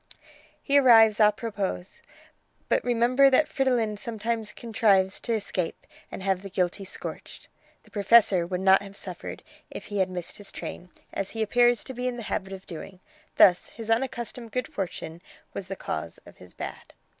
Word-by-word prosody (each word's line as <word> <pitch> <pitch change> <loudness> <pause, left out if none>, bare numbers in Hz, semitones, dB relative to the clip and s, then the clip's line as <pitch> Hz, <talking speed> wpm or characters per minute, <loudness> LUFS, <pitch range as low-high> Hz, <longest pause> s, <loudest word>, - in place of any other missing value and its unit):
"He 285 0 +3
arrives 225 -5 +6
a 210 -1 +7
propos. 205 -4 -4 0.7
But - - +2
remember 245 +3 +4
that 280 +3 +4
Fridolin 245 -8 0
sometimes 225 -1 -3
contrives 200 -4 +2
to 235 - -2
escape 190 -5 -3 0.3
and 190 - -7
have 190 -1 0
the 195 - -8
guilty 185 +1 -1
scorched. 185 - -8 0.3
The - - -22
Professor 200 -4 +4
would 180 0 -3
not 190 0 +6
have 200 0 -10
suffered 185 -3 -7 0.3
if - - -8
he 205 - 0
had 190 0 +2
missed 180 -2 -5
his 205 - -6
train, 180 - -7 0.2
as 195 - -3
he 220 - +1
appears 240 +2 +3
to 260 - -8
be 250 0 -3
in 245 -1 -3
the 235 - -6
habit 195 0 -3
of 190 0 -9
doing. 180 +2 -9 0.4
Thus 180 -2 +6
his 225 -1 -6
unaccustomed 235 -1 -2
good 250 -2 -2
fortune 170 -3 -5 0.3
was 190 - -5
the 195 - -4
cause 80 - -5
of - - -15
his 90 -1 -15
bad." - - -8
210 Hz, 175 wpm, -26 LUFS, 190-235 Hz, 0.7 s, a